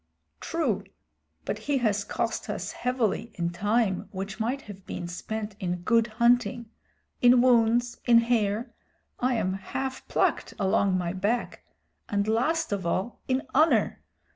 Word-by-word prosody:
"True, - - -1 0.6
but - - -2
he 285 - +3
has 210 -5 +1
cost 205 - -3
us - - -3
heavily 235 -3 -1
in 170 -1 -1
time 205 +1 0
which 195 +2 -5
might 250 +5 -1
have 195 -2 -11
been 175 - -5
spent 210 +4 -5
in 180 -3 -3
good 230 +3 +3
hunting, 235 0 +2 0.5
in 245 0 +7
wounds, 240 -1 +3
in 235 -2 +6
hair 230 0 0 0.5
I 250 0 +1
am 185 -4 0
half 260 +7 -5
plucked - - 0
along 190 -1 +2
my 175 -1 -2
back 205 +6 -1 0.5
and 200 0 0
last 310 +9 +1
of 200 -2 -1
all, 185 +7 -2
in 260 0 +1
honor. 310 +4 +3
220 Hz, 140 wpm, -27 LUFS, 195-245 Hz, 0.6 s, in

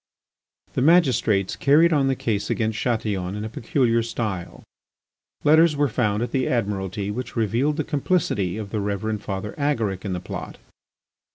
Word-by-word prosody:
The - - 0
magistrates 130 - +3
carried 160 +4 +4
on 140 -3 +3
the 135 - +1
case 105 -5 -2
against 110 -1 -1
Chatillon 105 -6 -1
in 105 +1 -4
a - - -4
peculiar 115 0 +1
style. 110 -6 -4 0.8
Letters 155 +1 +5
were 145 0 +2
found 105 -2 0
at 120 - -4
the 130 -1 0
Admiralty 100 -3 -2
which 125 +4 -5
revealed 120 +7 +1
the 155 - 0
complicity 140 - 0
of 105 -2 -6
the 110 - -1
Reverend 105 +1 -2
Father 100 +1 -4
Agaric 115 -10 0
in 100 -3 -3
the 90 - -2
plot. 90 - -7
110 Hz, 160 wpm, -23 LUFS, 100-135 Hz, 0.8 s, Letters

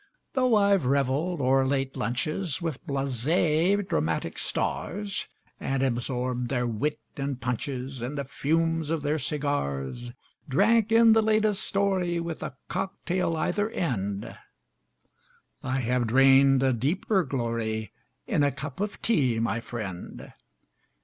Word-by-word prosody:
Though 255 -3 +3
I've 200 -8 +3
reveled 140 +5 +1
o'er 135 +1 +4
late 135 0 -1
lunches 150 - -2
With 165 -6 -4
blasé 155 - +1
dramatic 80 +2 -1
stars, 200 +2 -2 0.3
And 135 0 -1
absorbed 125 -1 -1
their 125 -2 0
wit 145 +7 -1 0.2
and 140 -2 -3
punches 125 +1 -3
And 130 +5 -4
the 140 - -1
fumes 165 +3 0
of 160 -2 -1
their 150 +2 0
cigars 120 - -2 0.4
Drank 220 - +3
in 225 0 +7
the 225 - +5
latest 215 -2 +2
story, 190 -3 +1
With 170 -1 -4
a 130 - -6
cock 195 0 -3
tail 180 -2 0
either 205 +6 0
end, 100 - -3 1.3
I 130 0 -1
have 125 0 0
drained 135 +2 +5
a 130 -1 +3
deeper 180 - +1
glory 115 - -2 0.3
In - - +1
a 145 0 +3
cup 140 +1 -7
of 205 0 -4
tea, 135 - +2
my 115 +1 0
friend. 105 -7 -7
140 Hz, 130 wpm, -27 LUFS, 125-175 Hz, 1.3 s, in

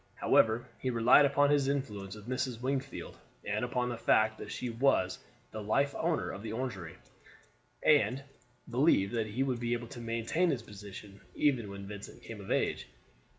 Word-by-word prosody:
However, 115 +2 +3
he 130 - -1
relied 120 +4 +6
upon 145 0 +3
his 145 -2 +3
influence 105 -9 -3
with 105 +1 -12
Mrs. 130 -2 -2
Wingfield, 135 +2 -3 0.3
and - - -1
upon 125 0 0
the 120 -1 -4
fact 110 -1 +3
that - - -7
she 125 - -4
was 115 -6 +1 0.3
the 110 - -5
life 140 +7 +1
owner 165 0 -1
of 95 - -7
the 110 0 -5
Orangery, 105 -9 -4 0.9
and 140 -3 +4 0.4
believed 120 -5 +3
that 115 -2 0
he 115 +6 -1
would 130 -3 -1
be 120 0 -1
able 120 -1 -4
to 120 -2 -8
maintain 115 +10 0
his 125 -7 -1
position 100 -1 -11
even 130 -8 +1
when 100 0 -7
Vincent 100 0 -9
came 110 -3 -8
of 95 - -10
age. - - 0
120 Hz, 175 wpm, -31 LUFS, 105-135 Hz, 0.9 s, relied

